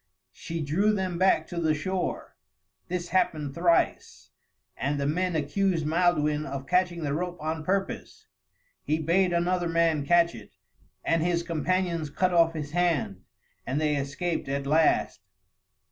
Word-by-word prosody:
She 165 +10 -5
drew 190 +9 +2
them 185 -4 -2
back 190 +1 +3
to 175 -1 -3
the 155 -2 +2
shore; 185 +4 -3 0.5
this 175 -1 -3
happened 155 -6 0
thrice, 170 +1 0 0.4
and 140 +2 -2
the 140 - -1
men 175 +4 0
accused 165 +2 0
Maelduin 155 -2 +2
of 135 -1 -5
catching 180 0 +1
the 140 -1 -1
rope 175 +3 -3
on 155 +1 -3
purpose; 195 +3 -3 0.6
he 155 - 0
bade 175 +4 +2
another 175 0 0
man 165 -3 +2
catch 170 +3 +3
it, 105 -4 -13 0.5
and 165 -1 +2
his 170 0 0
companions 170 -1 -1
cut 180 +5 0
off 165 -1 +4
his 150 -2 -5
hand, 165 - 0 0.4
and 135 +3 -2
they 150 -1 +1
escaped 145 +3 -3
at 140 0 -2
last. 155 +3 +2
165 Hz, 145 wpm, -27 LUFS, 150-180 Hz, 0.6 s, off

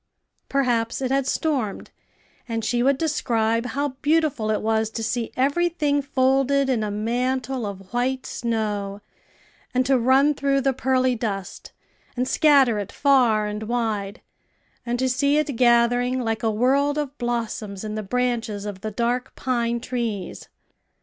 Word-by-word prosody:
Perhaps 240 -4 0
it 260 -1 -2
had 270 -1 +1
stormed, 270 -10 -2 0.6
and 225 -1 -2
she 240 +1 +1
would 270 +2 +3
describe 230 -7 0
how 285 +3 -1
beautiful 300 -8 +1
it 215 - +1
was 220 0 +1
to 225 0 -5
see 230 +1 -2
every 285 +7 +2
thing 295 -4 0
folded 270 0 +2
in 230 -4 0
a 210 - -2
mantle 245 +3 -1
of 195 0 -9
white 255 +2 -1
snow, 210 -4 -3 0.7
and 255 0 +3
to 265 0 +3
run 265 +5 +4
through 275 -1 +1
the 270 0 +1
pearly 255 0 +1
dust, 205 -5 -5 0.5
and 250 +1 0
scatter 275 -9 +4
it 200 - -5
far 245 -7 +3
and 210 0 -4
wide, 220 -3 -2 0.6
and 240 +1 0
to 260 +1 +1
see 280 +3 +2
it 300 -3 0
gathering 245 +1 +3
like 225 -3 -2
a 225 - +1
world 275 +6 +2
of 290 -2 -3
blossoms 225 -4 -3
in 215 0 -4
the 215 - -3
branches 230 -2 -2
of 200 -2 -6
the 215 - -3
dark 240 +4 -2
pine 235 -2 -1
trees. 235 -5 -4
245 Hz, 155 wpm, -23 LUFS, 220-270 Hz, 0.7 s, run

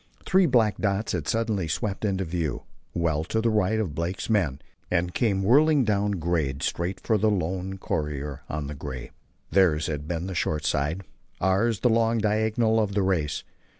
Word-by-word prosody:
Three 190 -1 +4
black 115 -6 +3
dots 100 +1 0
had 85 -4 -3
suddenly 110 -6 0
swept 100 +7 -2
into 95 -2 0
view, 80 -6 -2 0.3
well 80 -3 +1
to 110 - -1
the 115 0 +2
right 110 0 +2
of 95 -9 -2
Blake's 85 +7 -3
men, 85 -11 +1 0.3
and 90 0 0
came 100 -6 +1
whirling 145 +6 +5
down 105 -2 +1
grade 80 -6 -1
straight 90 +2 -2
for 110 -3 +1
the 110 +2 +3
lone 95 0 -2
courier 75 -5 -3
on 75 -1 -3
the 70 - -5
gray. 65 -4 -7 0.4
Theirs 80 -4 +3
had 75 -1 -4
been 85 0 -2
the 95 - -4
short 75 -3 -1
side, 75 +7 0 0.4
ours 100 +4 +1
the 125 - +4
long 115 0 +3
diagonal 110 +1 +2
of 100 -2 0
the 100 - +2
race. 80 -6 0
95 Hz, 180 wpm, -26 LUFS, 80-110 Hz, 0.4 s, whirling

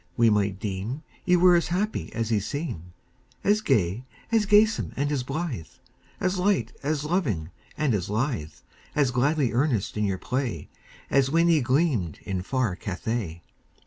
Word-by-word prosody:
we 115 -2 +5
might 100 -2 +1
deem 105 - -4 0.2
Ye 180 - +5
were 180 0 +6
happy 185 +5 -2
as 115 0 -2
ye 110 - +3
seem 100 - -5 0.5
As 210 +1 +3
gay, 105 - +1 0.3
as 220 -3 +3
gamesome, 215 +2 +4
and 145 +2 0
as 140 -3 0
blithe, 135 - -4 0.5
As 185 0 0
light, 195 +1 +1
as 145 0 -1
loving, 120 - -1 0.3
and 150 -5 +1
as 100 -3 -1
lithe, 110 - -1 0.4
As 140 -4 +3
gladly 135 +1 +2
earnest 120 -6 0
in 105 - +1
your 95 -2 0
play, 125 - -3 0.4
As 135 -1 +4
when 165 +3 +3
ye 160 -3 +4
gleamed 125 - +1
in 95 -2 -2
far 120 -1 -1
Cathay. 95 -3 -4
130 Hz, 155 wpm, -26 LUFS, 100-160 Hz, 0.5 s, were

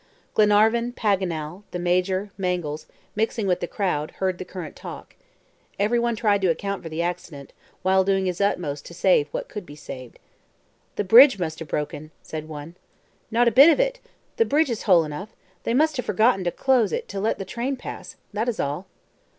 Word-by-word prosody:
Glenarvan, 220 +3 +3
Paganel, 185 -6 -1
the - - -4
Major, 185 +3 0
Mangles, 180 -5 -3 0.3
mixing 220 0 0
with 180 -2 +1
the 175 - -3
crowd, 165 -7 -1
heard 185 -2 -1
the 185 - -5
current 180 -3 -8
talk. - - -10 0.6
Everyone 235 +3 +1
tried 205 -2 +2
to 190 - +2
account 200 +4 -2
for 165 - -7
the 160 +2 -2
accident, 165 -5 -5 0.3
while 190 0 +4
doing 195 0 +1
his 180 0 -2
utmost 165 -8 -1
to 170 - -11
save 175 -5 +3
what - - -4
could 210 - -7
be 145 -4 -12
saved. 130 -4 -10 0.8
"The - - -1
bridge 235 +4 +8
must 160 -3 -3
have 165 - -7
broken," 150 +1 -4
said 155 -1 -6
one. 155 +3 -8 0.5
"Not 235 +2 +3
a - - +5
bit 275 +8 +8
of 330 - +3
it. - - +1 0.4
The 455 - +4
bridge 300 - +2
is 225 - -3
whole 175 -3 +7
enough; 155 +7 -7 0.3
they 230 - +1
must 310 +2 +2
have 250 - -2
forgotten 220 -3 +3
to 175 - +1
close 250 -4 +2
it - - -3
to 200 - -4
let 215 +3 0
the 195 - -5
train 240 +7 -3
pass. 255 - -8 0.2
That 220 +4 0
is 235 - -4
all." 145 +7 -2
190 Hz, 190 wpm, -24 LUFS, 170-225 Hz, 0.8 s, bridge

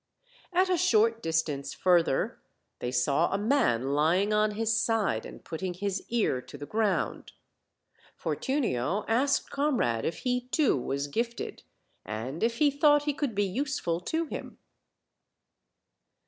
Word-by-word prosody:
At 370 +1 +3
a 365 -1 +2
short 230 -8 +3
distance 155 -4 -1
further 175 -6 +2 0.4
they 125 - -3
saw 140 +6 +2
a 195 - +1
man 200 - +1
lying 175 +8 +2
on 210 0 +2
his 225 0 +1
side 220 - +1
and - - -12
putting 180 +2 -4
his 195 0 -2
ear 215 - +1
to 145 - -11
the 145 - -7
ground. 210 +1 -1 0.8
Fortunio 205 - -1
asked 265 +5 +1
Comrade 250 - +1
if 165 - -2
he 250 0 -1
too 290 +3 +2
was 140 +2 -2
gifted, 235 +11 -3 0.4
and 120 +9 -5
if 230 +1 +1
he 290 +1 +4
thought 290 +1 +4
he 295 0 0
could 275 -6 -2
be 205 0 +2
useful 195 - -1
to 320 - -2
him. - - -7
210 Hz, 140 wpm, -28 LUFS, 150-250 Hz, 0.8 s, he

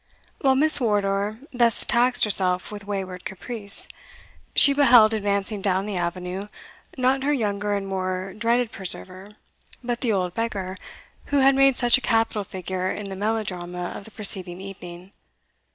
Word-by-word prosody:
While 270 -2 +2
Miss 300 +1 +5
Wardour 205 -1 0 0.2
thus 235 -2 +3
taxed 245 +1 +3
herself 185 -2 +3
with 205 -1 -9
wayward 190 -3 -5
caprice, 200 +1 -3 0.7
she, 280 - +8
beheld 245 -6 +5
advancing 200 -1 -2
down 190 0 0
the 210 -2 -5
avenue, 180 +2 -4 0.5
not 260 +1 +1
her 285 +2 0
younger 205 -5 -1
and 195 -1 -4
more 185 0 -4
dreaded 235 +1 0
preserver, 190 +1 -2 0.5
but 240 -1 -3
the 240 - +1
old 180 -3 -1
beggar 195 -5 -4 0.5
who 285 - -1
had 270 0 +5
made 270 -1 +4
such 245 +1 +3
a - - -17
capital 225 -3 0
figure 185 0 -4
in 205 -1 -6
the 195 - -6
melodrama 185 -4 -4
of 200 - -9
the - - -11
preceding 185 -4 +1
evening. 185 -1 -11
205 Hz, 150 wpm, -23 LUFS, 185-235 Hz, 0.7 s, she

